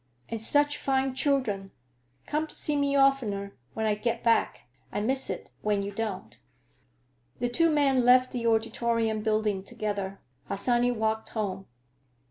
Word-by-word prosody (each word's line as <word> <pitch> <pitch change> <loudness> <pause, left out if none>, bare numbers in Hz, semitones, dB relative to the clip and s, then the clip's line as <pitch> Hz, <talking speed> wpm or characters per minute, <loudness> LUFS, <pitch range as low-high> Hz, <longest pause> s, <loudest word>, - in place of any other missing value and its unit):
And 225 -1 -3
such 290 +5 +3
fine 270 -1 0
children! 255 -9 0 0.6
Come 310 +1 -1
to - - -14
see 300 - 0
me 280 -1 +1
oftener, 235 -8 +2 0.2
when 220 - -1
I 215 - +2
get 230 +2 -2
back. 230 -1 +2 0.3
I - - -2
miss 260 +5 +1
it - - -5
when 205 -1 0
you 200 - -4
don't." 195 - -5 1.0
The 245 - -1
two 330 +7 +3
men 280 -4 +3
left 255 +1 +5
the 235 -2 -2
Auditorium 225 0 +1
Building 215 -3 0
together. 200 -1 -4 0.3
Harsanyi 240 +4 +1
walked 220 -1 -1
home. 195 -3 -4
230 Hz, 145 wpm, -28 LUFS, 210-265 Hz, 1.0 s, left